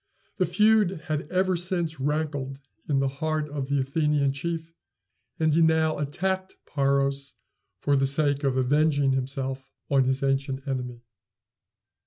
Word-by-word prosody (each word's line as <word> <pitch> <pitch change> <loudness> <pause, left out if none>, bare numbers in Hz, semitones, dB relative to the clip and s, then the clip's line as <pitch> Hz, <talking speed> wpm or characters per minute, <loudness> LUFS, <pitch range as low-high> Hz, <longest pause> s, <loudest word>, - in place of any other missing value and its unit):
The - - +2
feud 210 -5 +3
had 150 -1 -2
ever 185 0 +1
since 170 -3 -1
rankled 145 -2 -2 0.3
in 140 - +2
the 135 0 +2
heart 155 +2 -2
of 145 -2 -4
the 140 0 +1
Athenian 140 0 +1
chief, 165 +2 -4 0.7
and 155 -1 +2
he 165 - +4
now 160 -1 +3
attacked 185 +6 -2
Paros 140 -1 0 0.4
for 145 - +1
the 135 0 +2
sake 145 +1 +1
of 135 -2 +1
avenging 140 +1 +2
himself 135 0 -2 0.2
on 135 -2 +4
his 130 +1 0
ancient 135 0 -1
enemy. 125 -3 -4
145 Hz, 140 wpm, -26 LUFS, 135-160 Hz, 0.7 s, he